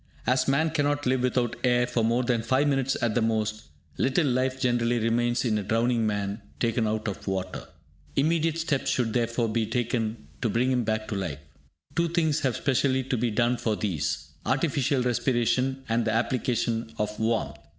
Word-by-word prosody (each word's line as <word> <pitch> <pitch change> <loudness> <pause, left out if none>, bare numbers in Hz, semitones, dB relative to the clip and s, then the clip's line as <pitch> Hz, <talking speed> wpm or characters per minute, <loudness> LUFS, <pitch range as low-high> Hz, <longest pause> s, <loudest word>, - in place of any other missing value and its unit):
As 130 +2 +2
man 155 +4 +2
cannot 145 -1 0
live 130 0 +2
without 125 -2 0
air 125 -1 +3
for 120 -2 -1
more 120 +3 +2
than 120 -2 +1
5 130 +5 +2
minutes 135 -1 +1
at 115 -2 +2
the 120 - +1
most, 110 -1 -1 0.3
little 135 +5 +2
life 130 0 0
generally 120 -2 +1
remains 120 +2 +1
in 110 -3 +1
a - - -3
drowning 115 +2 +1
man 100 0 -2 0.2
taken 115 -1 +1
out 110 0 -2
of 100 - -5
water. 95 -1 -3 0.5
Immediate 160 +2 +2
steps 160 -5 0
should, 115 -4 0
therefore, 115 -1 +1
be 110 0 0
taken 115 - -2
to 115 - +1
bring 125 +4 +1
him 125 -2 +1
back 110 0 -1
to - - -2
life. 85 -7 -3 0.6
Two 170 0 +2
things 160 -3 +1
have 130 -4 0
specially 130 -1 +1
to 130 +1 -1
be 120 0 0
done 120 +3 +1
for 110 -2 0
these, 80 - -2
artificial 135 -2 +1
respiration, 125 +2 +1
and 115 +1 +1
the 110 - 0
application 115 -1 0
of 105 0 -2
warmth. 110 0 0
120 Hz, 180 wpm, -27 LUFS, 110-130 Hz, 0.6 s, air